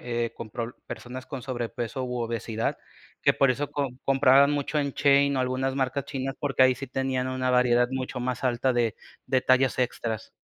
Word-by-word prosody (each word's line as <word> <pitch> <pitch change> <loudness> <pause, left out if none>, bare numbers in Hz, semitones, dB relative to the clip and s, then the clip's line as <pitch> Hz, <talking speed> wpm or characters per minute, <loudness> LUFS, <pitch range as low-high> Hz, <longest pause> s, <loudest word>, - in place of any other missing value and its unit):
eh, 120 -1 -2
con 115 -2 -8
proble 115 +2 -5
personas 125 +1 -7
con 135 -4 -6
sobrepeso 120 0 -4
u 125 0 -3
obesidad, 115 -1 -2 0.5
que - - +5
por 135 - +3
eso 140 +3 -2
com 140 -4 -3
compraban 135 +1 +5
mucho 145 +1 -1
en 140 -1 0
Shein 140 0 +3
o 130 - +1
algunas 130 +1 -1
marcas 135 0 -1
chinas 135 -1 -4
porque 135 -4 +1
ahí 130 0 +5
sí 135 - -7
tenían 130 0 -1
una 130 0 -1
variedad 125 -1 +3
mucho 130 -1 -4
más 125 +1 -3
alta 130 +1 +1
de 120 - +3 0.4
de 130 - 0
detalles 130 0 +2
extras. 115 -3 -2
130 Hz, 190 wpm, -26 LUFS, 125-135 Hz, 0.5 s, que